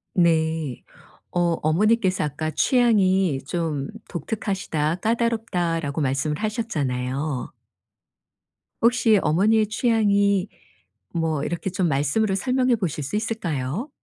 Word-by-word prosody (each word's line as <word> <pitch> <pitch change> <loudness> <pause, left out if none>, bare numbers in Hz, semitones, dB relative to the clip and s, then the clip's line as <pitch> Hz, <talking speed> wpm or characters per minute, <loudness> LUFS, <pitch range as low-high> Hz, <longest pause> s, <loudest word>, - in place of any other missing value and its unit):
네. 160 -5 +1 0.5
어 175 -1 +1
어머니께서 190 +4 +2
아까 155 +2 -3
"취향이 190 - +3
좀 155 -5 -2 0.2
독특하시다, 170 -3 -2
까다롭다."라고 180 -10 -1
말씀을 140 +2 0
하셨잖아요. 145 - -2 1.3
혹시 230 -2 +4
어머니의 210 +7 +3
취향이 205 -3 +2 0.7
뭐 160 -4 -1
이렇게 175 +3 -3
좀 180 -1 0
말씀으로 155 +9 +1
설명해 255 +3 +2
보실 165 -7 -3
수 145 +10 -4
있을까요? 200 - -2
175 Hz, 255 characters per minute, -23 LUFS, 150-220 Hz, 1.3 s, 혹시